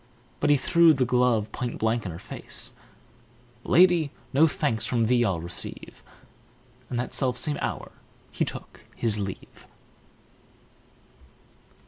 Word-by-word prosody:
But - - +1
he 145 - +6
threw 170 +2 +5
the 130 -1 +1
glove 125 -3 +2
point 120 +1 -4
blank 110 -1 0
in - - -4
her 80 - -7
face: - - -8 0.9
"Lady, 175 -4 +4 0.2
no 155 +4 +6
thanks 145 -9 -1
from 115 -2 +1
thee 120 +1 +3
I'll 95 -7 0
receive!" 85 +1 -8 0.9
And 120 - -3
that 120 - -4
selfsame 135 +3 -1
hour - - -4 0.4
he - - -1
took - - -7 0.2
his 110 -3 +1
leave. 100 -2 -7
125 Hz, 125 wpm, -26 LUFS, 110-145 Hz, 0.9 s, he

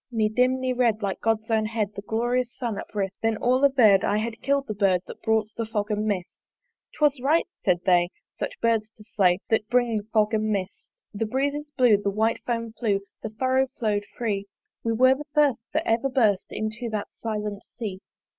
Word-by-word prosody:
Ne 220 -2 +2
dim 250 +3 +2
ne 255 0 0
red, 230 -4 +1
like 195 -1 -2
God's 225 0 0
own 220 -1 +2
head, 215 -2 -2
The 200 - -6
glorious 240 +3 -1
Sun 230 -5 -3
uprist: 195 -2 -4
Then 225 -1 +1
all 250 +3 +2
averr'd, 230 -9 +5
I 205 - +1
had 220 +1 -3
kill'd 280 0 +1
the 215 - -4
Bird 195 -3 +2
That - - -11
brought 220 -1 +1
the 230 - -1
fog 215 -1 -2
and 210 +1 -1
mist. 185 -4 -4 0.5
'Twas 290 -4 +2
right, 305 +6 +3 0.2
said 180 -3 +2
they, 175 -2 +4 0.2
such - - -5
birds 225 -2 +1
to 210 - -14
slay 185 -4 +2
That 220 0 +1
bring 245 -2 +2
the 210 - -3
fog 215 0 +2
and 215 0 +1
mist. 195 -3 -3 0.2
The 215 +2 -2
breezes 285 +5 -1
blew, 245 -5 +6
the 200 0 -1
white 220 +3 +1
foam 230 -2 -2
flew, 205 -4 0 0.2
The - - -4
furrow 260 +4 +1
follow'd 210 -3 0
free: 200 -4 -2 0.4
We 230 - 0
were 255 +3 +5
the 295 +3 -7
first 290 -5 +4
that 315 +2 0
ever 230 +4 +1
burst 220 -7 +2
Into 215 +2 -4
that 215 -2 -3
silent 210 -2 -4
Sea. 205 -6 -5
220 Hz, 200 wpm, -25 LUFS, 210-250 Hz, 0.5 s, blew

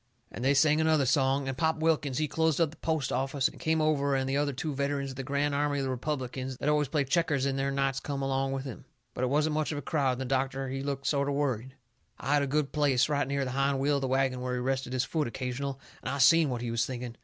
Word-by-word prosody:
And 120 - -6
they 140 +2 +3
sung 150 +2 +4
another 160 -3 +3
song, 135 +1 +2
and 135 - -2
Pop 160 +3 +1
Wilkins, 155 -4 +1
he 155 - +1
closed 160 +1 +1
up 165 -3 +2
the 165 - -15
post 160 -4 -1
office 135 +1 +1
and - - -10
come 160 0 +1
over 140 -2 +2
and 130 0 0
the 135 - 0
other 145 0 +1
two 145 +3 -3
veterans 140 0 -1
of - - -9
the 135 - -4
Grand 140 +2 0
Army 145 0 0
of 140 - -1
the 130 - -1
Republicans 130 -1 -3
that 140 - -4
always 150 -1 +2
plays 140 0 0
checkers 150 -3 +1
in 135 -1 0
there 135 0 0
nights 135 -1 0
come 140 -1 -4
along 135 0 0
with 135 0 -3
him. 130 - -8 0.3
But 125 - -3
it 125 - +1
wasn't 150 +3 +2
much 155 0 0
of 150 - -3
a 145 - -5
crowd, 140 -3 +1
and 125 - -5
the - - -2
doctor 135 +1 -1
he 135 +1 -3
looked 140 0 -3
sort 140 -1 +1
o' - - 0
worried. 130 -2 -2 0.4
I 140 - -1
had 145 - +4
a 140 - 0
good 145 +1 0
place, 140 -3 +2
right 145 -2 +1
near 140 0 -1
the 130 - -3
hind 135 +1 +1
wheel 140 +2 +2
of - - -3
the 135 - -1
wagon 130 -1 +1
where 125 0 -2
he - - -2
rested 130 0 -1
his 130 0 +1
foot 155 -4 -1
occasional, 130 +3 -4 0.2
and - - -4
I 140 - -2
seen 155 +3 +6
what 120 -2 -3
he 120 - -2
was 115 0 +1
thinking. 125 -1 -5
140 Hz, 280 wpm, -29 LUFS, 130-145 Hz, 0.4 s, seen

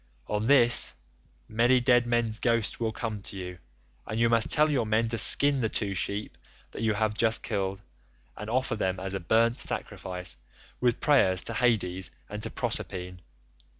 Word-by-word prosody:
On 105 +1 -2
this, 120 -4 +5 0.5
many 120 +3 +3
dead 120 -1 +3
men's 120 -2 0
ghosts 115 -3 0
will 115 -1 -1
come 110 -2 -5
to 100 - -6
you, 90 -1 -7 0.5
and 110 +2 -3
you 115 0 +3
must 115 -1 +2
tell 150 +1 +4
your 125 -6 0
men 110 +2 +1
to 115 0 0
skin 140 +4 +5
the 110 - 0
two 100 -3 -3
sheep 100 +2 -4 0.3
that - - -8
you 110 -2 +1
have 110 0 0
just 110 +1 +1
killed, 100 -2 -3 0.5
and 105 +1 -8
offer 130 0 0
them 95 -3 -2
as 95 +1 -5
a 95 - -2
burnt 115 +7 +1
sacrifice 90 -6 -3 0.4
with 120 -2 0
prayers 95 -11 +3
to - - -3
Hades 95 -7 0 0.2
and 105 +1 -6
to 115 - -2
Proserpine. 90 -7 -4
110 Hz, 175 wpm, -27 LUFS, 100-120 Hz, 0.5 s, this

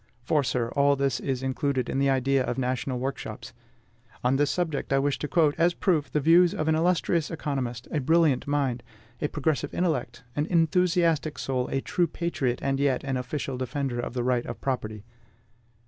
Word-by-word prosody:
For, 145 +3 +2
sir, 120 -2 -1
all 140 +1 +3
this 135 -2 0
is 130 -2 -2
included 130 -1 -1
in 135 - -1
the 140 0 +3
idea 135 0 +2
of - - -3
national 130 0 -1
workshops. 125 -5 -5 0.7
On 125 +2 +3
this 145 +1 +2
subject 165 -7 -2
I 135 - +4
wish 140 0 0
to 150 - -3
quote, 155 -2 +3
as 170 +1 +3
proof, 160 -7 +1
the 150 - +1
views 170 +5 +5
of 155 -5 -2
an 160 - +4
illustrious 170 0 +1
economist, 135 -7 -3
a 155 - 0
brilliant 155 -1 +2
mind, 140 -4 0 0.4
a - - +1
progressive 150 -1 -1
intellect, 135 -9 -1
an 145 +2 0
enthusiastic 165 -2 +2
soul, 130 -2 -1
a 135 - -1
true 175 +4 0
patriot, 150 -7 -2
and 135 0 0
yet 140 -2 +1
an 135 -1 -2
official 130 0 -3
defender 130 -1 -2
of 120 - -4
the 125 - 0
right 125 -1 0
of 120 - -6
property. 110 -6 -3
140 Hz, 185 wpm, -27 LUFS, 130-160 Hz, 0.7 s, views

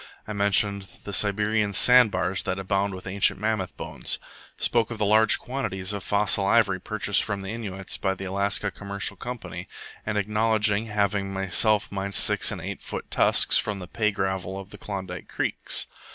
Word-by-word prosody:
I 110 - -4
mentioned 100 -1 +3 0.2
the 100 - -7
Siberian 105 +1 +1
sand 125 +3 +7
bars 95 0 -1
that 95 - -3
abounded 95 0 -1
with 95 - -10
ancient 95 +1 +1
mammoth 105 -3 -2
bones; - - -2 0.4
spoke 115 -2 +2
of 120 - -5
the 105 - 0
large 110 +2 +4
quantities 105 -7 -4
of 100 -2 -5
fossil 105 -1 +2
ivory 100 -2 +3
purchased 105 +1 +1
from 100 -2 -3
the 95 +3 -5
Innuits 95 -4 -5
by 95 -1 0
the 95 - -7
Alaska 100 +2 -1
Commercial 100 +1 -2
Company; 125 -1 -7 0.4
and 105 -1 -2
acknowledged 105 +1 +1
having 100 -2 -1
myself 95 +2 +1
mined 100 -1 -4
six - - +4
and - - -5
eight - - -6
foot - - -7
tusks - - +5
from 105 -2 -2
the 90 -2 -8
pay 105 +2 0
gravel 95 -1 -3
of 95 0 -11
the 105 - -11
Klondike 95 -4 -6
creeks. - - -1
100 Hz, 175 wpm, -25 LUFS, 95-105 Hz, 0.4 s, sand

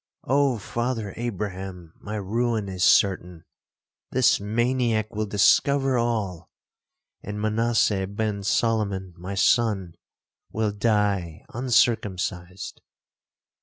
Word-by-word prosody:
'Oh, 140 -1 +2
Father 115 -1 -3
Abraham, 95 -6 -5
my 105 +1 -6
ruin 110 +1 -1
is 95 -2 -3
certain, 90 -3 +3 0.7
this 130 -2 +3
maniac 115 0 0
will 110 0 -1
discover 135 +6 +3
all, 110 -8 -1 0.7
and 105 +1 -6
Manasseh 110 -2 +1
ben 100 0 -2
Solomon, 100 -3 0
my 90 +3 -6
son, 100 -5 +2 0.6
will 110 -1 0
die 100 -6 0
uncircumcised.' 100 -6 0
105 Hz, 95 wpm, -25 LUFS, 95-115 Hz, 0.7 s, certain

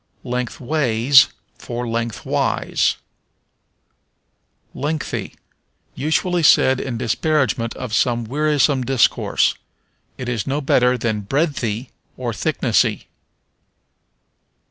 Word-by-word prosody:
Lengthways 125 +1 +2 0.3
for 120 0 -5
Lengthwise. 115 -2 -1 1.8
Lengthy. 150 +2 -4 0.6
Usually 160 +5 0
said 130 -4 +5
in 125 -3 -4
disparagement 130 0 0
of 125 -4 -6
some 120 0 +1
wearisome 145 +1 +1
discourse. 130 -2 +2 0.6
It 130 - -6
is 120 -5 -2
no 140 +2 0
better 125 -3 +2
than 110 -3 -2
breadthy, 135 -5 -1 0.3
or - - -3
thicknessy. - - 0
130 Hz, 80 wpm, -20 LUFS, 115-145 Hz, 1.8 s, said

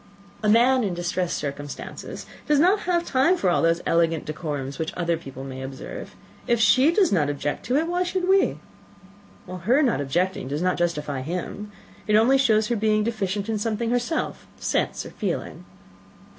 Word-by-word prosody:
"A 210 - +1
man 245 +3 +5
in 190 -4 -1
distressed 175 0 -1
circumstances 145 0 -6 0.2
has 300 - +4
not 370 +7 +4 0.2
time 280 +7 +3
for 185 - +1
all - - +2
those 165 +1 +2
elegant 165 -1 +1
decorums 145 -3 -4
which 160 - -2
other 170 -1 +1
people 135 -5 -9
may 130 -1 -7
observe. 130 0 -8 0.3
If 235 -1 +2
she 260 +6 +5
does 375 0 +3
not 155 -7 +2
object 145 0 -3
to 250 - +1
it, 310 +3 +2
why 350 +1 0
should 365 0 -1
we?" 385 +1 +3 0.9
"Her 185 - +1
not 240 - +1
objecting 175 +2 -1
does 145 +5 -2
not 185 0 +1
justify 150 -5 -1
him. 180 +7 -5 0.4
It 210 - +3
only 250 +5 +5
shows 220 -4 +3
her 240 - +1
being 215 0 +2
deficient 205 -3 -2
in 220 -2 -1
something 225 +2 -1
herself 245 +6 -2
sense - - -1
or - - -9
feeling." - - -4
200 Hz, 170 wpm, -24 LUFS, 160-245 Hz, 0.9 s, man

